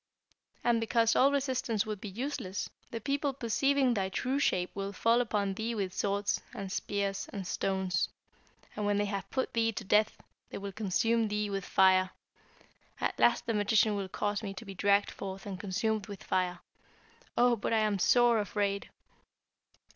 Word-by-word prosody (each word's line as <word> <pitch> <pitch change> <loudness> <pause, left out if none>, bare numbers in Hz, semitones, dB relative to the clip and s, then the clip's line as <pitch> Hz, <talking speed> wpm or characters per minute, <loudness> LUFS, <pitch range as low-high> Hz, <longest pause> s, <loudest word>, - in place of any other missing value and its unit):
And 235 -1 +3
because 230 0 +2
all 275 +2 +5
resistance 260 -6 0
would 210 -2 -5
be 210 - -5
useless, 225 -3 -4 0.2
the 230 - -4
people 280 +3 -1
perceiving 265 +1 +2
thy 195 -4 -1
true 255 +8 -1
shape 180 -10 +1
will 200 0 -4
fall 230 +4 +3
upon 205 -4 0
thee 225 +4 -3
with 195 -4 -2
swords, 200 +1 0
and 195 -1 -5
spears, 200 -1 -2
and 195 -2 -5
stones; 190 0 0 0.7
and 210 -1 -1
when 205 0 +2
they 205 - +1
have 200 -1 -4
put 260 - -2
thee 225 0 +2
to 215 - -5
death, 210 +2 +3 0.3
they - - -6
will 200 0 -5
consume 220 +3 +1
thee 210 0 -1
with 195 -2 -3
fire. 185 -1 +4 0.9
At - - -2
last 240 - +4
the 230 - 0
magician 210 0 +3
will 195 -2 -3
cause 205 +2 -1
me 195 -3 -5
to 205 - -8
be 195 - -7
dragged 200 +2 +2
forth 195 0 -7
and 195 -3 -5
consumed 210 +2 -1
with 200 -6 -8
fire. 180 -1 -1 0.8
Oh, 245 0 +5
but 205 - -3
I 225 - +3
am 210 -2 +1
sore 240 +3 +5
afraid!' 200 -1 -1
205 Hz, 175 wpm, -31 LUFS, 195-230 Hz, 0.9 s, all